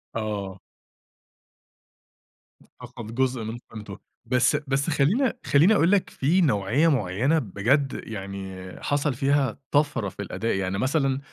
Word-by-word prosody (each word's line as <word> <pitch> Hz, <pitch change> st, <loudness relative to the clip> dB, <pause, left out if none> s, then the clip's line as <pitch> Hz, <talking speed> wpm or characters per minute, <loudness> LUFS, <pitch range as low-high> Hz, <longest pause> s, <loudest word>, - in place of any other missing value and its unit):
آه. 100 Hz, -3 st, -4 dB, 2.3 s
فقد 115 Hz, -1 st, -9 dB
جزء 130 Hz, -3 st, 0 dB
من 110 Hz, +2 st, -5 dB
قيمته، 105 Hz, -3 st, -9 dB, 0.3 s
بس 125 Hz, +4 st, +3 dB
بس 140 Hz, +4 st, 0 dB
خلّينا 185 Hz, -, +2 dB
خلّيني 170 Hz, +10 st, +5 dB
اقول 175 Hz, 0 st, +3 dB
لك 200 Hz, -2 st, +2 dB
في 165 Hz, +8 st, +1 dB
نوعية 130 Hz, -, +2 dB
معيّنة 130 Hz, -, +2 dB
بجد 125 Hz, +6 st, 0 dB
يعني 95 Hz, -3 st, -7 dB
حصل 145 Hz, -1 st, 0 dB
فيها 135 Hz, -2 st, +1 dB
طَفرة 145 Hz, -8 st, +1 dB
في 100 Hz, -, -9 dB
الأداء، 110 Hz, +2 st, -2 dB
يعني 95 Hz, 0 st, -2 dB
مثلًا 135 Hz, +1 st, +1 dB
130 Hz, 120 wpm, -25 LUFS, 100-145 Hz, 2.3 s, خلّيني